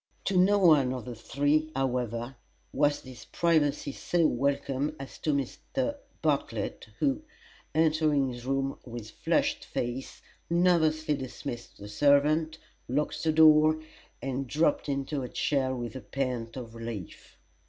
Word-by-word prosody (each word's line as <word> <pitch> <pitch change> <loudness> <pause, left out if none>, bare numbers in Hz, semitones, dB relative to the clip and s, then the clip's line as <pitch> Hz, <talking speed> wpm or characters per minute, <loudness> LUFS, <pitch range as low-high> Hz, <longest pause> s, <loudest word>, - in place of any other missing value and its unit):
To 195 - 0
no 190 +3 +5
one 150 -9 +5
of 125 -4 -6
the 125 - -5
three, 145 +7 0
however, 125 -1 -1 0.4
was 145 0 +2
this 130 -2 -11
privacy 155 -4 +1
so 170 +4 0
welcome 140 +1 0
as 135 - -9
to 155 - 0
Mr. 255 - -2 0.3
Bartlett, - - -1
who, 285 0 +1 0.5
entering 155 -3 +3
his 120 0 -9
room 135 0 -1
with 115 -3 -8
flushed - - 0
face, 120 +2 -4 0.3
nervously 160 -3 +3
dismissed 125 -3 -6
the 100 - -9
servant, 145 +7 +3 0.3
locked 145 +4 -1
the 160 - +3
door, 155 0 +6 0.4
and 135 0 -2
dropped 150 +2 +1
into 140 +1 -2
a 125 - -5
chair 130 -3 0
with 120 -2 -5
a 130 - -5
pant 125 -3 -3
of 115 -3 -7
relief. 115 -5 -8
140 Hz, 135 wpm, -29 LUFS, 125-155 Hz, 0.5 s, door